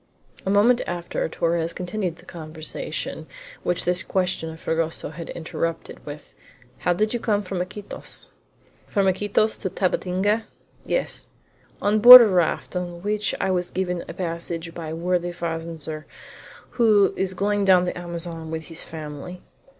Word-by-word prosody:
A - - +2
moment 220 +5 +4
after 175 -2 -3
Torres 165 0 0
continued 180 -1 -3
the - - -18
conversation 160 - -5 0.3
which 175 - -1
this 180 +1 +2
question 180 -3 -1
of 160 0 -9
Fragoso 160 -2 -2
had 165 +1 -8
interrupted, 165 0 -4
with: 145 0 -9 0.5
"How 180 - +1
did 215 +5 0
you 240 - -1
come 210 -2 0
from 185 -1 -3
Iquitos?" 205 +3 -7 0.6
"From 200 -2 +1
Iquitos 205 +3 +1
to 190 - -2
Tabatinga?" 190 +4 0 0.4
"Yes." - - -2 0.6
"On 210 +1 +3
board 250 +3 +13
a 230 - +6
raft, 180 -2 0
on 175 -1 -4
which 210 0 0
I 190 - +1
was 180 -1 0
given 180 -2 -2
a - - -5
passage 170 -1 -4
by 165 -2 -6
a 160 - -4
worthy 175 +1 0
fazender 165 -2 -5 0.8
who 210 -4 +5
is 190 -1 -2
going 205 +1 +1
down 185 -2 +5
the 180 - -2
Amazon 170 -2 -6
with 160 0 -4
his 165 - -3
family." 155 +3 -8
180 Hz, 150 wpm, -24 LUFS, 165-200 Hz, 0.8 s, board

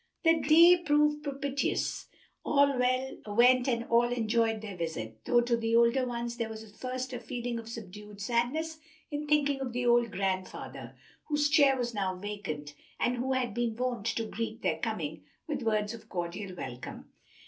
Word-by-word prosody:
The 325 -1 +5
day 335 +4 +7
proved 300 -2 +2
propitious, 280 -1 -2 0.4
all 280 -1 +3
went 250 -1 +3
and 235 -2 +1
all 235 +1 +3
enjoyed 225 -2 +1
their 205 -3 -7
visit, 115 -11 -5
though 240 - +4
to 240 0 +1
the 230 0 0
older 235 +2 +4
ones 235 0 -4
there 230 -2 -2
was 220 0 -7
at 210 -1 -16
first 255 +1 -4
a 245 - -3
feeling 240 0 -4
of 225 0 -9
subdued 210 -2 -9
sadness 250 +9 -1 0.3
in 295 0 -3
thinking 290 -2 +2
of 255 -3 -3
the 245 0 -1
old 240 -1 +4
grandfather, 190 -1 -4 0.3
whose 295 -1 +1
chair 280 -2 +5
was 240 -1 -2
now 190 -3 -1
vacant, 180 -7 -5 0.3
and 245 +1 +1
who 260 +2 0
had 250 -4 -1
been 235 -1 -1
wont 245 -3 -2
to 230 0 -1
greet 225 +1 -5
their - - 0
coming 165 -9 -3 0.2
with 290 -4 -2
words 215 -2 0
of 230 - -11
cordial 180 +2 -4
welcome. 125 -6 -8
235 Hz, 170 wpm, -30 LUFS, 210-265 Hz, 0.4 s, day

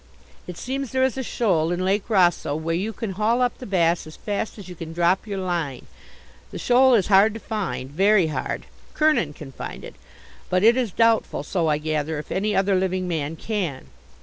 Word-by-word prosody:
It 180 -2 -7
seems 270 +1 -4
there 260 0 +2
is 260 -2 +1
a 265 - -2
shoal 180 -10 0
in 180 +1 -1
Lake 195 +3 0
Rosseau 175 -7 +2
where 160 +2 -2
you 195 +6 -1
can 220 -1 -5
haul 215 +5 +1
up 245 - -1
the 250 - -8
bass 170 -4 +1
as 155 - -11
fast 210 +1 -4
as 200 -4 -10
you 180 - -8
can 165 -1 -8
drop 175 +5 +1
your 200 -2 -3
line. 170 -8 -3 0.6
The - - -7
shoal 255 +1 +5
is 200 -5 +3
hard 205 +2 +5
to - - -5
find 210 - -4
very 195 +3 +4
hard. 155 - -3 0.3
Kernin 305 - +2
can 145 -2 -10
find - - -8
it, - - -9 0.6
but 185 +1 +1
it 230 +2 +6
is 250 -5 0
doubtful 230 +2 +2
so 170 -4 -1
I 150 -1 +2
gather 155 0 -2
if 150 - -8
any 210 +2 0
other 195 +1 +2
living 185 -1 0
man 160 -2 -2
can. 175 -9 -4
190 Hz, 205 wpm, -23 LUFS, 165-220 Hz, 0.6 s, it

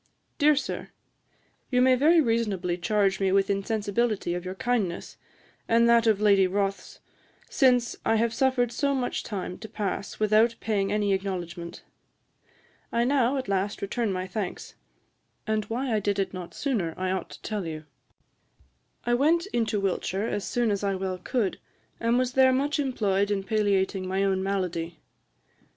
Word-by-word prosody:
'Dear 300 +1 +5
Sir, 285 - -4 0.8
You 250 - +2
may 255 +1 +5
very 310 +7 +5
reasonably 215 - 0
charge 195 +2 +1
me 195 -1 +1
with 195 +1 +3
insensibility 205 -1 -1
of 175 0 -4
your 185 +1 -5
kindness, 205 -6 -2 0.5
and 235 +1 +4
that 235 -1 +4
of 215 -3 +3
Lady 200 -3 +4
Rothes, 195 +1 -2 0.5
since 250 -4 +3
I 225 - +2
have 230 +1 +1
suffered 260 -3 +1
so 280 +2 0
much 250 -2 -2
time 190 -3 -5
to 220 - -9
pass 200 -1 -4
without 215 +2 +3
paying 200 -3 0
any 205 -1 +1
acknowledgement. 175 -3 -4 1.1
I 235 - +2
now, 260 0 +2
at 260 - -3
last, 195 +1 -1
return 215 +2 -1
my 185 0 -2
thanks; 190 0 -5 0.7
and 215 -1 0
why 240 +3 -2
I 215 - +2
did 205 0 -1
it 195 -1 -1
not 180 -2 -8
sooner 205 - -1
I 185 0 -1
ought 190 - -3
to - - -12
tell 205 -5 -3
you. 155 -1 -6 1.2
I 240 - +1
went 320 +7 +3
into 225 -3 0
Wiltshire 195 +1 -1
as 205 -3 -2
soon 240 -3 0
as 200 0 -2
I 200 -1 0
well 185 -1 -3
could, 215 0 -1 0.4
and 230 +1 +2
was 250 -1 0
there 260 0 +5
much 285 +4 0
employed 205 -8 0
in 200 -2 -1
palliating 195 -2 0
my 190 +1 0
own 190 -1 +1
malady. 180 -4 -2
205 Hz, 165 wpm, -26 LUFS, 190-240 Hz, 1.2 s, Dear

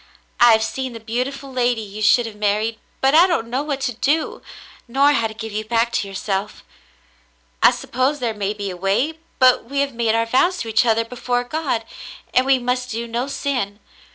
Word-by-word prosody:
I 240 -1 +7
have 220 0 +3
seen 260 +1 -4
the 230 - -8
beau 225 +3 -1
tiful 275 0 -8
lady 245 -2 +1
you 210 +1 -8
should 225 +3 +4
have 225 -2 -7
married, 215 +2 0 0.2
and 270 +2 +4
I 345 +3 +7
don't 235 -11 -1
know 260 +3 0
what 290 -2 -3
to 250 -2 -1
do, 290 +7 0 0.5
nor 275 +4 +4
how 230 -6 +1
to 220 - -11
give 220 +1 -6
you 215 +1 -3
back 230 +2 +1
to 200 - -1
yourself. 195 +1 -4 1.0
I - - +8
suppose 260 +4 -1
there 240 -4 -2
may 205 0 -2
be 200 -2 -4
a - - -7
way, 215 - 0 0.2
but 255 -3 +4
we 280 +3 -1
have 280 -1 -1
made 230 -1 +1
our 230 0 +2
vows 305 +10 +2
to 225 - -4
each 220 +2 +3
other 230 0 +2
before 245 +1 -2
God, 265 -4 -2 0.5
and 255 +1 +3
we 270 -1 +5
must 250 0 -2
do 230 +1 -3
no 235 +3 -2
sin. 250 -8 -3
240 Hz, 210 wpm, -21 LUFS, 220-265 Hz, 1.0 s, I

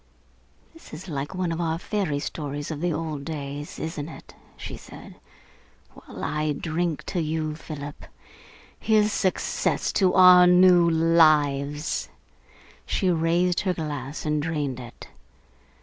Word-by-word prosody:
"This 330 - -12
is 180 +5 -10
like 145 +2 -4
one 180 -2 -1
of 165 +1 -2
our 165 -1 -1
fairy 185 -5 -2
stories 145 0 -5
of 155 -1 -5
the 175 0 0
old 155 -2 -4
days, 145 -1 -6
isn't 160 -1 -5
it?" - - -12 0.2
she - - -7
said. - - -12 0.8
"Well, - - -11
I 150 0 -1
drink 165 +1 -2
to 180 - -2
you, 155 0 -2
Philip. 150 -2 -8 0.7
Here's 215 -1 +3
success 185 -2 0
to 185 -2 +2
our 180 -1 +8
new 180 -1 +6
lives!" 155 -3 +2 0.8
She 185 -3 +1
raised 170 +2 +1
her 185 -2 -1
glass 145 -2 -5
and 150 -1 0
drained 145 -5 -2
it. 120 -1 -11
160 Hz, 135 wpm, -25 LUFS, 145-175 Hz, 0.8 s, our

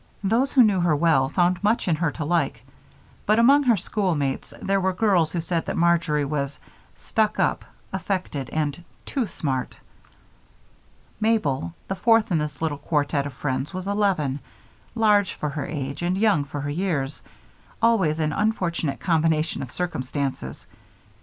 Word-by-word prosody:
Those 230 +8 +2
who 260 - +7
knew 205 -4 +3
her 170 -3 +3
well 145 -4 +3
found 175 +3 +1
much 215 +1 +2
in 165 -3 +2
her 165 -1 +1
to 155 - -4
like, 145 -7 0 0.6
but 215 +1 +4
among 270 +5 +6
her 245 -6 +3
schoolmates 170 -8 -1
there 195 0 0
were 190 0 +1
girls 180 -5 +2
who 175 - -2
said 165 0 -2
that - - -2
Marjory 165 -4 +2
was 140 -1 -2 0.4
"stuck 215 -1 0
up," - - +1 0.3
affected, 175 - -3
and 155 +1 -2 0.2
"too 260 -6 -1
smart." 135 -7 -3 1.4
Mabel, 155 - 0
the - - -1
fourth 225 +2 +3
in 165 - +3
this 150 0 -4
little 150 -3 -1
quartet 145 -1 0
of 140 - -8
friends, 135 +5 -3
was 185 0 -4
eleven, 190 -10 +1 0.6
large 210 -4 +3
for 150 - -3
her 145 -1 -4
age 140 -1 -4
and 180 +2 0
young 200 -9 +3
for 145 0 -5
her 145 +1 -3
years, 145 -5 -2 0.6
always 205 -10 +3
an 155 -2 0
unfortunate 175 -9 -1
combination 160 -3 +1
of 130 - -6
circumstances. 135 - -3
165 Hz, 155 wpm, -24 LUFS, 145-195 Hz, 1.4 s, who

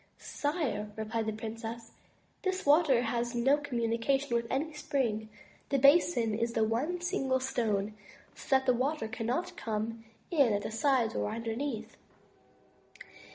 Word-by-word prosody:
"Sire,*' 285 -9 -2
replied 220 0 -2
the - - +1
princess, 225 +1 -6 0.5
this 375 -1 -2
water 285 -4 +5
has 240 +1 -1
no 265 +5 +4
communi 235 -5 -1
cation 270 0 +1
with 235 0 0
any 305 +4 -1
spring; 245 -8 -1 0.4
the 275 - +2
basin 275 -4 +4
is 230 +2 -1
one 235 +11 +1
single 270 -8 0
stone, 220 -5 -1 0.4
so - - -13
that 265 0 +2
the 255 - +4
water 260 0 -1
cannot 245 +9 -2
come 225 +1 -3 0.3
in 280 -10 +4
at 205 - -1
the - - -4
sides 245 -1 +2
or 105 0 -1
underneath. 230 0 -4
235 Hz, 140 wpm, -31 LUFS, 225-280 Hz, 0.5 s, water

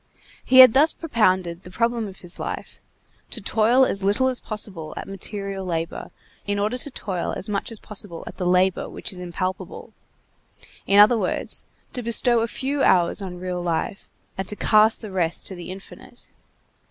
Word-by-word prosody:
He 260 0 +8
had 255 -3 +9
thus 300 +4 +4
propounded 185 - 0
the 180 - -12
problem 230 +3 -1
of 190 -1 -12
his 175 0 -6
life: - - -6 0.5
to - - -5
toil 225 +5 +3
as 195 -5 -1
little 205 +7 +2
as 255 - -2
possible 200 -7 -4
at - - -6
material 195 0 -5
labor, 165 -2 -4 0.4
in 205 0 0
order 210 +4 0
to 290 - -1
toil 190 -8 -4
as 190 - -2
much 205 +2 -2
as 225 - -6
possible 205 -5 -5
at - - -10
the 180 -2 -2
labor 185 +1 +2
which - - -5
is 185 - -8
impalpable; 185 +1 -5 0.9
in 200 - +4
other 220 +3 +7
words, 185 - -1 0.3
to 250 - -3
bestow 235 +1 +3
a 225 - 0
few 275 +4 -2
hours 180 -2 +3
on 180 -2 -6
real 180 0 -4
life, 175 +4 -3 0.3
and 190 - -3
to 210 - -2
cast 215 +1 +4
the 215 -3 -8
rest 170 -3 0
to - - -3
the 175 -2 -9
infinite. 190 +1 -12
200 Hz, 180 wpm, -23 LUFS, 180-225 Hz, 0.9 s, had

